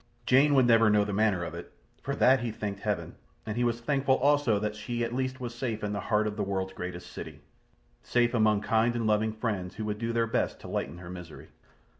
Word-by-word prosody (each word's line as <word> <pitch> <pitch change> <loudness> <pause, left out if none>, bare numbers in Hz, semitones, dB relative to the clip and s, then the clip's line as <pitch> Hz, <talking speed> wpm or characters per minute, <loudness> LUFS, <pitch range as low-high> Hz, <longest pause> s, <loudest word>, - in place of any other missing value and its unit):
Jane 140 +3 +5
would 130 -2 +5
never 115 -2 +5
know 105 -1 +4
the 105 - -3
manner 100 -3 +2
of 85 - -5
it. - - -9 0.3
For 140 - -3
that 130 -1 +5
he 120 0 -2
thanked 105 -2 -5
Heaven; - - -3 0.3
and 105 - -4
he 120 - 0
was 120 -1 0
thankful 135 +1 +2
also 145 -5 +3
that 105 +1 -2
she 120 +3 -3
at 115 - -3
least 130 +1 -2
was 120 -2 -5
safe 120 -3 -3
in 105 0 -2
the 100 - -2
heart 105 +2 +1
of 105 0 -3
the 105 - 0
world's 95 -1 -2
greatest 90 -1 -7
city. - - -8 0.6
Safe 120 0 +1
among 110 -3 +3
kind 115 +2 +2
and 115 -1 -1
loving 110 0 +2
friends 110 -5 -3
who 110 - -4
would 105 0 -3
do 115 0 -2
their 115 0 +1
best 115 - -1
to - - -9
lighten 80 +5 -3
her 85 0 -10
misery. 90 -3 -10
110 Hz, 235 wpm, -29 LUFS, 105-120 Hz, 0.6 s, Jane